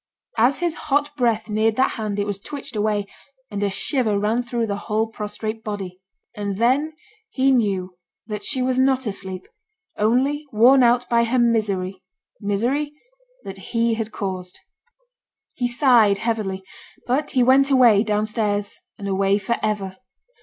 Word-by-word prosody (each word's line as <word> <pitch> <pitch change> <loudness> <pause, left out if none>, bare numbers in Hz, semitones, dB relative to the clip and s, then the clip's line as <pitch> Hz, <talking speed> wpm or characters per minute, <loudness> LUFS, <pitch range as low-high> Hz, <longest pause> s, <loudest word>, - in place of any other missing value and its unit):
As 255 +8 +3
his 345 -2 0 0.2
hot 290 +1 +1
breath 230 -5 +1
neared 215 +1 +1
that 260 +2 +2
hand 215 -3 -4
it 205 - 0
was 205 -1 -4
twitched 280 +2 -8
away, 210 -1 0 0.5
and 205 -1 -3
a 205 - +1
shiver 215 +1 0
ran 215 +4 +1
through 240 -1 -2
the 205 -2 -2
whole 215 +1 +2
prostrate 220 0 -6
body. 190 -3 -6 0.3
And 200 -2 -3
then 265 +8 +2 0.4
he 270 -9 +2
knew 195 -7 0 0.3
that 210 -1 -5
she 255 +4 -1
was 255 0 +1
not 260 0 +2
asleep, 190 -3 -5 0.5
only 265 +7 +1
worn 245 +5 +6
out 245 0 +3
by 235 -1 +3
her 245 +2 0
misery, 200 -6 0 0.4
misery 245 +9 -1 0.5
that 195 0 -8
he 230 -1 +1
had 225 -1 -3
caused. 185 -3 -5 1.0
He 245 - -1
sighed 240 -5 +4
heavily; 205 -4 -2 0.4
but 275 +4 0
he 250 - +6
went 270 +2 +5
away, 240 -6 +5
down 210 -1 0
stairs, 205 -2 -2 0.2
and 200 - -6
away 195 +1 +2
for 210 +4 -1
ever. 200 -3 -2
220 Hz, 155 wpm, -22 LUFS, 205-250 Hz, 1.0 s, worn